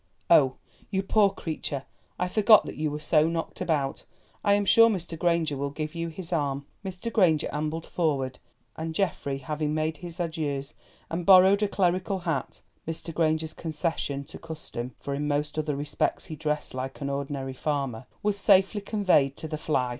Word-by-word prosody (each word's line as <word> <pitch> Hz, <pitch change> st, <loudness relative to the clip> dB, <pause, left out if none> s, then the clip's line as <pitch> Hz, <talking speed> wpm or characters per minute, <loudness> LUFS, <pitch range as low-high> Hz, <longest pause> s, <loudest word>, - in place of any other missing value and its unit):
Oh! 135 Hz, -6 st, +6 dB, 0.3 s
you 195 Hz, -1 st, 0 dB
poor 205 Hz, +1 st, +4 dB
creature, 150 Hz, -6 st, -4 dB, 0.3 s
I 180 Hz, -, 0 dB
forgot 215 Hz, +3 st, +6 dB
that -, -, -6 dB
you 155 Hz, 0 st, -1 dB
were 150 Hz, +1 st, -4 dB
so 155 Hz, +1 st, +3 dB
knocked 165 Hz, -1 st, -4 dB
about. 140 Hz, -5 st, -1 dB, 0.4 s
I 205 Hz, -, +4 dB
am 205 Hz, 0 st, +2 dB
sure 230 Hz, +3 st, +7 dB
Mr. 175 Hz, -5 st, -3 dB
Granger 170 Hz, -3 st, +1 dB
will 140 Hz, +1 st, -2 dB
give 155 Hz, +1 st, -5 dB
you 170 Hz, 0 st, -3 dB
his 170 Hz, +2 st, -5 dB
arm." 140 Hz, -3 st, -1 dB, 0.2 s
Mr. 190 Hz, +4 st, -5 dB
Granger 165 Hz, -7 st, +4 dB
ambled 155 Hz, +2 st, -2 dB
forward, 135 Hz, -7 st, -1 dB, 0.4 s
and 160 Hz, 0 st, -4 dB
Geoffrey 150 Hz, -8 st, -1 dB
having 150 Hz, +2 st, -2 dB
made 155 Hz, 0 st, -1 dB
his 175 Hz, +2 st, -8 dB
adieus, 150 Hz, -5 st, -2 dB, 0.4 s
and 170 Hz, +2 st, -2 dB
borrowed 190 Hz, +2 st, +7 dB
a 210 Hz, -, +3 dB
clerical 185 Hz, 0 st, +1 dB
hat 170 Hz, -3 st, -3 dB, 0.3 s
(Mr. 165 Hz, +1 st, -4 dB
Granger's 160 Hz, -1 st, +1 dB
concession 155 Hz, -3 st, -2 dB
to 150 Hz, -, -10 dB
custom, 150 Hz, -6 st, -6 dB
for 140 Hz, -, -4 dB
in 145 Hz, +1 st, -2 dB
most 150 Hz, +1 st, -1 dB
other 150 Hz, -2 st, -1 dB
respects 145 Hz, +1 st, -1 dB
he 155 Hz, -, -7 dB
dressed 150 Hz, -1 st, -2 dB
like 130 Hz, +1 st, -5 dB
an 140 Hz, -1 st, -3 dB
ordinary 140 Hz, -1 st, -3 dB
farmer), 130 Hz, -4 st, -2 dB, 0.2 s
was 205 Hz, -1 st, +1 dB
safely 195 Hz, +1 st, +4 dB
conveyed 185 Hz, -10 st, +2 dB
to 160 Hz, -, -5 dB
the 155 Hz, -, -3 dB
fly. 150 Hz, -5 st, 0 dB
160 Hz, 175 wpm, -27 LUFS, 145-180 Hz, 0.4 s, sure